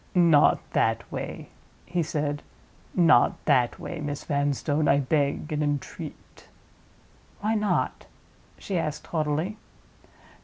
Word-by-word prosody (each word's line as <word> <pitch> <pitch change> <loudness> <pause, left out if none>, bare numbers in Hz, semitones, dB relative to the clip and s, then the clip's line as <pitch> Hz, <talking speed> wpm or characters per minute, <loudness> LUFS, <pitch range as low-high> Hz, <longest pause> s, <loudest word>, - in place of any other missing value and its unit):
"Not 170 -5 +6
that - - 0
way," - - -6 0.4
he 175 0 -1
said; 150 -2 -2 0.5
"not 165 -9 +5
that 125 -5 +2
way, 170 - -6
Miss 145 -1 -4
Vanstone, 145 +1 0
I 140 - +5
beg 145 +2 0
and 150 - -1
entreat!" 145 -2 -5 0.9
"Why 215 +2 +1
not?" 210 -2 0 0.5
she 190 -3 -2
asked 155 -2 -3
haughtily. 160 +6 -1
150 Hz, 110 wpm, -26 LUFS, 145-170 Hz, 0.9 s, Not